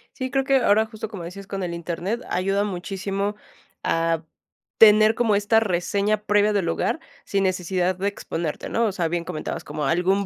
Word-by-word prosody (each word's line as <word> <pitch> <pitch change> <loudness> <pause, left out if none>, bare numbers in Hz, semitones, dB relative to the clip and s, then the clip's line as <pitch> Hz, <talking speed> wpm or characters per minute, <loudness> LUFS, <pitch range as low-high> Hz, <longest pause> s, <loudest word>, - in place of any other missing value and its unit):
Sí, 260 -1 -3
creo 270 +1 +1
que 275 0 +3
ahora 220 -2 +4
justo, 220 -1 -7
como 195 -6 -7
decías, 195 +3 -8
con 195 -1 -4
el 175 -1 -3
Internet, 175 +7 -3
ayuda 195 +2 +1
muchísimo 195 +1 -3 0.5
a 165 0 0 0.6
tener 215 0 +7
como 225 -4 +2
esta 210 +2 +3
reseña 200 +2 +1
previa 210 0 +3
del 200 -4 +1
lugar, 170 - 0 0.2
sin 195 -1 0
necesidad 185 0 0
de 195 +2 -2
exponerte, 165 -5 -4
¿no? 230 0 +1
O - - 0
sea, 175 -3 -1
bien 170 +1 -2
comentabas, 160 -3 -5
como 150 -2 -4
algún 185 +7 +2
195 Hz, 180 wpm, -24 LUFS, 175-210 Hz, 0.6 s, tener